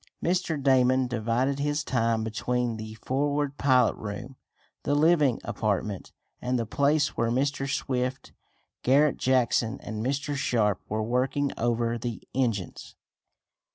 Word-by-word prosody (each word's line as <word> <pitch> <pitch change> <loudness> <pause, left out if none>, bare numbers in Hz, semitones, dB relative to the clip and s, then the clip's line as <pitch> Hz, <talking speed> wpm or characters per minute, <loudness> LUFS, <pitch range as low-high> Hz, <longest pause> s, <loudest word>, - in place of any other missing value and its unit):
Mr. 175 -3 0
Damon 130 -1 +3
divided 120 +3 0
his 145 +1 0
time 115 -3 0
between 120 +1 -1
the 110 0 -7
forward 140 +4 -1
pilot 130 -2 +4
room, 105 +5 -7 0.5
the 145 - 0
living 150 -5 +3
apartment, 105 -3 -2 0.3
and 125 +1 0
the 115 - -1
place 145 +6 +2
where 115 - -1
Mr. 135 +2 0
Swift, 130 -1 -2 0.5
Garret 140 +3 +3
Jackson 125 -1 +1
and 110 -1 -5
Mr. 140 +3 -1
Sharp 110 -7 +1
were 110 +1 -1
working 130 +4 0
over 115 0 0
the 120 -1 -5
engines. 115 -8 -2
125 Hz, 125 wpm, -27 LUFS, 115-140 Hz, 0.5 s, pilot